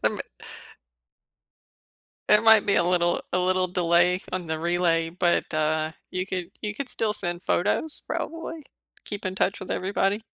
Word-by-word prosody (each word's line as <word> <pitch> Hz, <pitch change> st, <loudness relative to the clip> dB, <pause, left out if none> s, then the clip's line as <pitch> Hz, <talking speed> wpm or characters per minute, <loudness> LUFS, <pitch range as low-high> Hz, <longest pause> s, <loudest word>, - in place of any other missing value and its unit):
There -, -, +4 dB
m -, -, -6 dB, 2.1 s
there 210 Hz, +1 st, +6 dB
might 220 Hz, -2 st, +7 dB
be 200 Hz, -, +3 dB
a 175 Hz, -, +3 dB
little 175 Hz, -1 st, +2 dB
a 180 Hz, -, +2 dB
little 185 Hz, 0 st, +2 dB
delay 175 Hz, 0 st, +3 dB
on 180 Hz, -2 st, -3 dB
the 160 Hz, 0 st, -2 dB
relay, 165 Hz, -1 st, +1 dB
but, 175 Hz, 0 st, +1 dB
uh, 155 Hz, 0 st, 0 dB, 0.2 s
you 185 Hz, 0 st, -2 dB
could 180 Hz, -2 st, -4 dB
you 210 Hz, 0 st, -3 dB
could 265 Hz, +4 st, -5 dB
still 220 Hz, -3 st, 0 dB
send 175 Hz, -3 st, -3 dB
photos, 300 Hz, -, 0 dB
probably. 330 Hz, -1 st, -4 dB, 0.4 s
Keep 205 Hz, -1 st, -6 dB
in 185 Hz, -, -3 dB
touch 195 Hz, +1 st, 0 dB
with 190 Hz, -, -8 dB
everybody. 195 Hz, +2 st, 0 dB
180 Hz, 160 wpm, -25 LUFS, 175-205 Hz, 2.1 s, might